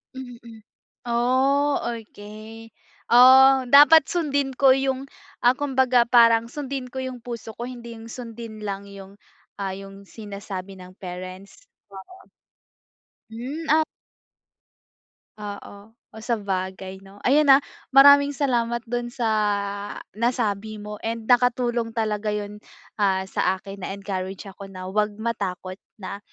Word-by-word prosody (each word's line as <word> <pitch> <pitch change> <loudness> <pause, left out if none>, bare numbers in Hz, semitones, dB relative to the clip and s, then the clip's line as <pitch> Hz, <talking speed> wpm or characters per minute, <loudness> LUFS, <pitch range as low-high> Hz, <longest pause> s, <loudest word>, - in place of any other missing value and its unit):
Mm 235 -3 -11 0.4
Oh, 260 +4 +2
okey. 225 -1 -8 0.4
Oh, 260 +2 +7
dapat 295 +1 +8
sundin 285 -5 -1
ko 265 +1 +4
yung, 270 0 -2 0.3
ah, 245 +2 +4
kumbaga 260 -4 +2
parang, 230 -1 +5
sundin 270 0 -5
ko 260 - -3
yung 260 -1 -5
puso 230 -2 -7
ko, 240 - -4
hindi 235 -2 -9
yung 225 - -11
sundin 230 -3 -9
lang 200 -1 -5
yung, 200 0 -12 0.4
ah, 195 -1 -3
yung 195 0 -11
sinasabi 200 -2 -8
ng 185 0 -12
parents. 185 - -9 0.2
Oo. 200 - -13 1.0
Hmm, 260 +8 -6
at 315 +1 +5 1.6
Oo. 205 +1 -9 0.2
Oh, 220 - -11
sabagay 190 -4 -3
'no? 195 +1 -17
Ayan, 290 +3 +4
ah, 275 +1 +7 0.3
maraming 285 +1 +7
salamat 235 -4 0
dun 240 0 -3
sa 240 -2 -2 0.8
nasabi 220 -2 -1
mo, 210 0 -8
and 225 0 -4
nakatulong 240 -1 +1
talaga 210 -1 -1
yun, 210 0 -6 0.4
ah, 190 -2 +2
sa 190 0 0
akin. 195 +1 -10
Na-encourage 195 0 -5
ako 195 +1 -11
na 185 -1 -8
'wag 210 +1 0
matakot 195 -4 -4 0.2
na, 200 0 -7
225 Hz, 125 wpm, -23 LUFS, 200-255 Hz, 1.6 s, dapat